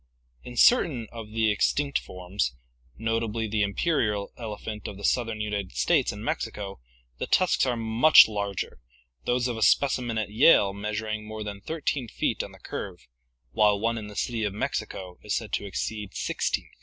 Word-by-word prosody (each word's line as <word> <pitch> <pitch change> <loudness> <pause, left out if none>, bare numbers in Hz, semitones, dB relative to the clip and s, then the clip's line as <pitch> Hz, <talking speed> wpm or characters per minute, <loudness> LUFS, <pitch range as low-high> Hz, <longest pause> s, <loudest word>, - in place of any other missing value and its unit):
In 120 -1 -9
certain 155 - +5
of 115 -2 -8
the 110 0 +2
extinct 140 +7 +1
forms, 90 -8 -3 0.4
notably 115 0 -1
the 105 0 0
imperial 105 - 0
ele 110 -3 -6
phant 105 -1 -6
of 100 0 -6
southern 115 -3 +1
United 105 -3 -3
States - - +2
and - - -8
Mexico, 100 -1 -3 0.4
the - - -2
tusks 185 -7 +3
are 125 - +1
much 115 +7 +7
larger, 100 - -3 0.5
those 125 0 +1
of 120 -2 -3
a - - -5
specimen 125 -1 +3
at 105 -2 -2
Yale 105 -4 +5
measuring 105 +1 -3
more 110 0 -5
than 100 -1 -6
13 145 -1 -2
feet - - -1
on - - -7
the - - -14
curve, - - -7 0.4
while 105 +6 +3
one 115 +2 0
in 105 - -7
the 105 - -10
City 115 0 -1
of 100 -1 -2
Mexico 90 -3 -4
is 105 - -2
said 110 - -4
to - - -1
exceed 105 +1 -4
16 - - -1
feet. - - -22
110 Hz, 175 wpm, -27 LUFS, 105-115 Hz, 0.5 s, much